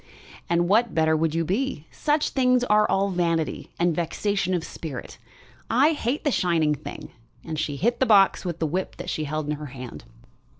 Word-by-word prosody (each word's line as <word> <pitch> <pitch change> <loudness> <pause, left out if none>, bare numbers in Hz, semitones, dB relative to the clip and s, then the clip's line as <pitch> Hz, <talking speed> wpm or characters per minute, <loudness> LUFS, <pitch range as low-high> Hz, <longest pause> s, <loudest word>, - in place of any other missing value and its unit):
"And 170 0 +2
what 225 +4 +2
better 160 -1 +3
would 160 0 0
you 165 0 +1
be? 210 - -2
Such 300 0 0
things 250 -2 +2
are 210 -3 +3
all 195 +1 +1
vanity 170 -3 -1
and 170 -1 +1
vexation 185 +2 -1
of 170 - -2
spirit. 150 -7 -7 0.5
I 275 +7 +4
hate 285 -2 -2
the 290 - +1
shining 165 -7 +2
thing." 145 - -8 0.3
And 155 -2 -4
she 150 -2 -2
hit 235 - 0
the 260 - +2
box 200 -3 +5
with 175 -3 -3
the 165 - -1
whip 180 +5 -2
she 155 - -2
held 155 +1 -3
in 150 0 -2
her 150 0 -7
hand. 125 -2 -9
175 Hz, 185 wpm, -25 LUFS, 155-220 Hz, 0.5 s, box